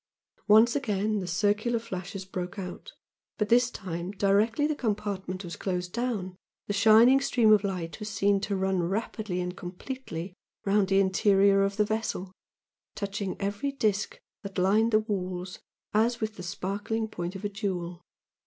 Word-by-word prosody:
Once 220 +3 +6
again 215 -5 0
the 185 - -4
circular 210 +6 +1
flashes 195 -3 -6
broke 185 0 -5
out, 195 - -7 0.4
but 210 -1 0
this 245 +1 +5
time 175 -5 -5
directly 205 +7 +2
the 305 - +1
compartment 200 -6 -3
was 170 -1 -6
closed 180 -2 -3
down, 225 -7 -2 0.3
the 205 - -2
shining 225 +6 +6
stream 235 -5 +4
of 210 -1 +4
light 180 -4 -3
was 210 0 -5
seen 205 -1 +2
to 200 +1 -2
run 190 -1 +1
rapidly 195 +1 -2
and 180 0 -3
completely 180 -1 -6 0.3
round 200 0 +3
the 195 0 +3
interior 195 +1 +4
of 195 +1 0
the 210 - +3
vessel, 215 -3 -3 0.6
touching 200 -1 -4
every 200 +8 -2
disc 230 - -1 0.2
that 200 -2 -8
lined 210 +5 +3
the 215 0 +4
walls 185 -4 -4 0.3
as 230 +3 +2
with 220 -1 -3
the - - -8
sparkling 205 +5 -3
point 175 -3 -5
of 195 - -6
a - - 0
jewel. 180 -4 -4
200 Hz, 160 wpm, -28 LUFS, 185-220 Hz, 0.6 s, Once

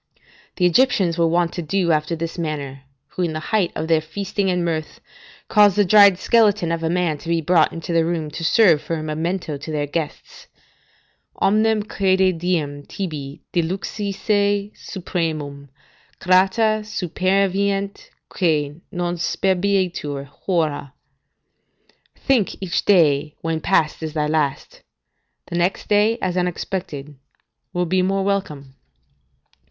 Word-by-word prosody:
The 180 - +1
Egyptians 180 -4 +3
were 165 - +4
wont 170 0 +1
to 175 - -4
do 175 +1 0
after 155 +1 0
this 165 0 -5
manner, 145 -5 -5 0.2
who - - -5
in 170 -3 0
the 155 - -3
height 205 -5 +2
of 160 - -3
their 160 -1 +3
feasting 195 +4 -3
and 180 -1 0
mirth, 160 -2 -3 0.5
caused 205 -2 +5
a 205 - +4
dried 200 -1 +7
skeleton 210 -6 +2
of 165 0 -2
a 165 - -1
man 170 -4 0
to 165 - -8
be 170 0 +2
brought 165 0 +3
into 165 +1 -5
the 165 -1 +3
room 160 -2 -2
to 160 - -6
serve 170 -3 +4
for 165 - -3
a 155 - -4
memento 160 0 -3
to 145 +3 -8
their 150 -1 -1
guests: 150 +1 -6 0.9
"Omnem 215 +1 +2
crede 190 -3 +1
diem 155 -5 -1
tibi 150 -6 -6
diluxisse 200 +3 -1
supremum 155 -7 -4 0.5
Grata 195 +4 +3
superveniet, 195 0 -1 0.2
quae 155 -3 -1
non 175 0 -2
sperabitur, 180 -6 0
hora." 145 -3 -2 1.2
["Think 255 -8 0
each 180 -3 -2
day 150 -6 +3
when 165 -1 -2
past 160 -5 +1
is 160 -1 -4
thy 150 -1 0
last; 150 -2 -2 0.6
the - - -6
next 175 +2 -1
day, 210 +2 +3
as 180 -1 -1
unexpected, 175 -5 -4 0.5
will 180 0 -1
be 185 +2 0
the 185 - +1
more 195 0 0
welcome." 150 -9 -3
175 Hz, 140 wpm, -21 LUFS, 155-195 Hz, 1.2 s, dried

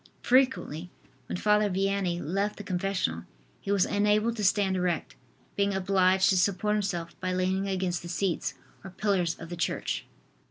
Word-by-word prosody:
Frequently, 250 - +2 0.4
when - - -3
Father 210 +1 +3
Vianney 195 -2 0
left 195 +6 -1
the 205 - -7
confessional, 180 - -1 0.3
he 195 - -4
was 200 -2 +3
unable 210 +3 +2
to 220 -2 -4
stand 195 0 +2
erect, 180 -3 -1 0.4
being 200 -1 +1
obliged 190 0 +3
to 190 - +3
support 200 +3 +1
himself 185 -5 -2
by 185 0 -2
leaning 185 +2 0
against 185 -3 -1
the 170 - -8
seats 180 +1 -1 0.3
or 190 - -7
pillars 185 -3 0
of 165 - -10
the 175 - -5
church. 170 - -2
190 Hz, 160 wpm, -28 LUFS, 180-200 Hz, 0.4 s, Father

